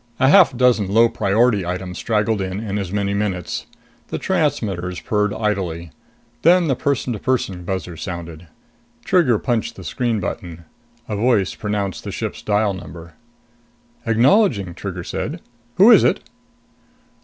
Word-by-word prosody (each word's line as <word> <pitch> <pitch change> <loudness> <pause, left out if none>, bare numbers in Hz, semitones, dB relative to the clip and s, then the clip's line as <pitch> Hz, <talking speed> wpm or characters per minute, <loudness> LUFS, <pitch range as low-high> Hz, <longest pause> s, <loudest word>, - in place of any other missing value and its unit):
A 135 0 +4
half 165 -7 +6
dozen 120 -6 +3
low 115 +3 +5
priority 105 0 +2
items 90 +1 -5
straggled 110 -2 0
in, 95 +1 -3
in 105 -2 -3
as 95 -3 -4
many 100 0 -1
minutes. 100 -4 -3 0.4
The - - -4
transmitters 90 -3 -1
purred 105 -1 0
idly. 95 -7 -2 0.5
Then 175 +3 +5
the 135 - +1
person 130 -1 -1
to 105 - -5
person 100 -8 -1
buzzer 95 -2 -4
sounded. 85 0 -7 0.6
Trigger 160 - +3
punched 115 -1 -2
the 95 - -10
screen 115 +7 -1
button. 85 -4 -6 0.4
A 105 - -3
voice 105 -3 +1
pronounced 105 -3 -3
the - - -5
ship's - - -5
dial 105 -1 +1
number. 85 -2 -10 0.9
"Acknowledging," 115 - +3
Trigger 90 0 -6
said. 155 - -4 0.4
"Who 205 +6 +7
is - - +7
it?" - - +2
105 Hz, 145 wpm, -20 LUFS, 90-120 Hz, 0.9 s, Who